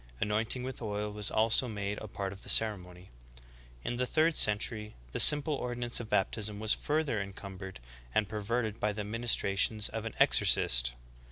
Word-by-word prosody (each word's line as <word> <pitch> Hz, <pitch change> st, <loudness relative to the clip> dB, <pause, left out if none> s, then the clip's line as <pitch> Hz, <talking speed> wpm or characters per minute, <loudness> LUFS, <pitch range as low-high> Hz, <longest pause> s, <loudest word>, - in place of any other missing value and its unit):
Anointing 110 Hz, +4 st, +2 dB
with 130 Hz, 0 st, -7 dB
oil 105 Hz, -1 st, -4 dB
was 105 Hz, 0 st, -1 dB
also 110 Hz, +3 st, +2 dB
made 105 Hz, -2 st, -5 dB
a 110 Hz, -, -9 dB
part 100 Hz, -1 st, -6 dB
of 100 Hz, -, -14 dB
the -, -, -8 dB
ceremony. 90 Hz, -4 st, 0 dB, 0.7 s
In 120 Hz, -, -4 dB
the 125 Hz, 0 st, -2 dB
third 160 Hz, +3 st, +1 dB
century 105 Hz, 0 st, +1 dB, 0.2 s
the -, -, -5 dB
simple 150 Hz, +1 st, +7 dB
ordinance 120 Hz, -3 st, -3 dB
of 115 Hz, -2 st, -8 dB
baptism 105 Hz, +1 st, -1 dB
was 110 Hz, 0 st, +1 dB
further 150 Hz, -8 st, -2 dB
encumbered 95 Hz, -, -9 dB, 0.4 s
and 105 Hz, -2 st, +1 dB
perverted 110 Hz, +1 st, -3 dB
by 105 Hz, 0 st, -1 dB
the 105 Hz, 0 st, -5 dB
ministrations 105 Hz, -1 st, 0 dB
of 110 Hz, 0 st, -6 dB
an 115 Hz, -, -7 dB
exorcist. -, -, +3 dB
105 Hz, 165 wpm, -30 LUFS, 100-120 Hz, 0.7 s, simple